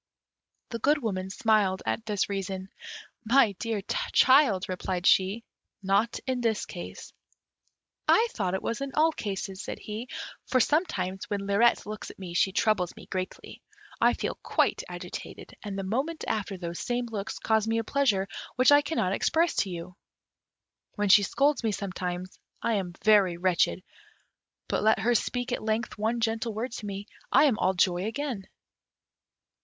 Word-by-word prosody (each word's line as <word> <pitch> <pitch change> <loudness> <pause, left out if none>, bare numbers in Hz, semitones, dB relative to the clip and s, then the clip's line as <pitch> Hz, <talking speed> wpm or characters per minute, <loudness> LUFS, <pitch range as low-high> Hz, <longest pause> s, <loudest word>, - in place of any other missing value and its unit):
The 230 - -4
Good 290 +7 +3
Woman 190 -4 -2
smiled 200 -2 +2
at 225 - -2
this 205 -3 0
reason. 195 -1 -4 0.5
"My 235 -1 +5
dear 225 -3 -2 0.3
child," 260 -8 +5
replied 185 0 -3
she, 195 +5 +3 0.4
"not 195 +4 +1
in 255 -2 -1
this 225 -3 0
case." 175 - -9 0.9
"I 455 +1 +5
thought 190 -4 -1
it - - -4
was 230 - -2
in 275 -1 -4
all 315 +2 +4
cases," 195 -6 -4
said - - -5
he; 220 +4 -7 0.4
"for 255 - +3
sometimes, 195 - 0
when 200 -1 -2
Lirette 205 +4 +3
looks 215 0 -6
at - - -12
me, 185 -3 -7
she 190 +2 +2
troubles 190 -3 +1
me - - -12
greatly; 185 0 -6 0.4
I - - +5
feel - - -4
quite - - +1
agitated; - - -8
and 200 -2 -5
the 195 - -3
moment 270 +12 -2
after 200 -2 -2
those 170 -1 -5
same 245 0 -1
looks 215 -3 -5
cause 220 -1 +1
me 225 0 +1
a 225 - 0
pleasure 215 -7 +1 0.3
which 255 +2 +5
I 290 0 +7
cannot 285 - -1
express 330 - +2
to 195 - +1
you. 175 0 -7 1.0
When 205 -1 0
she 205 +2 +8
scolds 280 +7 +1
me 220 - +1
sometimes, 185 -2 -4 0.2
I 230 - 0
am 190 -4 -2
very 200 -5 +5
wretched; 180 0 +1 0.8
but - - 0
let 220 +1 +4
her 240 +2 +3
speak 245 +2 -1
at - - -1
length 220 +1 -1
one 225 +2 0
gentle 225 -1 -1
word 235 +4 -3
to 225 -2 -6
me, 200 0 -5 0.3
I - - +6
am 270 -8 +3
all 190 +1 +2
joy 180 0 +2
again." 235 -5 -4
210 Hz, 165 wpm, -28 LUFS, 190-240 Hz, 1.0 s, she